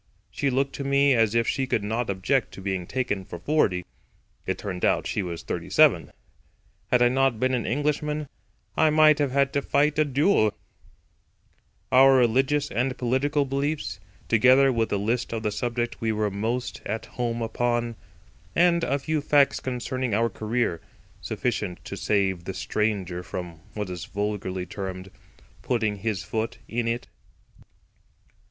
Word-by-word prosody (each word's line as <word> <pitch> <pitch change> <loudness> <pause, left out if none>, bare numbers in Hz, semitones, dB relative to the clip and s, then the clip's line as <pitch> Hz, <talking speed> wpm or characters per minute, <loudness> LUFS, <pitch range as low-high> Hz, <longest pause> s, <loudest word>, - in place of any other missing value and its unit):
She 140 - 0
looked 135 +1 0
to 140 - -4
me 140 0 +4
as 115 -2 +2
if 115 -1 +2
she 135 -1 0
could 110 - 0
not 115 +2 -2
object 100 +8 0
to - - -10
being 95 -2 -3
taken 120 -7 -2
for 90 - -8
forty. 90 - +1 0.6
It - - -1
turned 95 -3 -5
out - - +2
she - - -1
was 85 -3 -5
thirty - - -4
seven. - - +4 0.8
Had 125 -1 +4
I - - +6
not 130 -2 +2
been 130 +2 +1
an 125 - -1
Englishman 150 +2 -1 0.5
I 160 - +4
might 155 -1 +5
have 145 -2 +2
had 140 +1 +1
to 140 - +1
fight 150 +2 +1
a - - +6
duel); 140 - +2 1.4
our 135 +1 +7
religious 130 +4 +2
and 125 +2 -1
political 140 +4 +1
beliefs; 135 - -2 0.3
together 130 +4 +5
with 115 -1 0
a 100 - +1
list 115 +4 -1
of 110 -1 -3
the 105 - 0
subjects 120 +2 -3
we 115 -1 +1
were 105 -1 0
most 115 +5 -3
at 110 +2 -4
home 120 -1 -3
upon; 120 +1 -1 0.6
and 170 0 +4
a 140 - +1
few 155 +2 -1
facts 145 -1 +3
concerning 130 -2 -2
our 115 +1 +1
career—sufficient 110 -1 -3
to - - -6
save 95 -4 0
the 95 - -5
stranger 100 -5 -1
from, 90 -2 -7 0.2
what 105 -3 -3
is 90 -2 -5
vulgarly 100 -3 -3
termed 95 0 -6 0.5
"putting 110 -4 0
his 100 -1 -2
foot 110 0 -3
in 115 0 -2
it." 115 +1 -2
120 Hz, 160 wpm, -25 LUFS, 105-135 Hz, 1.4 s, our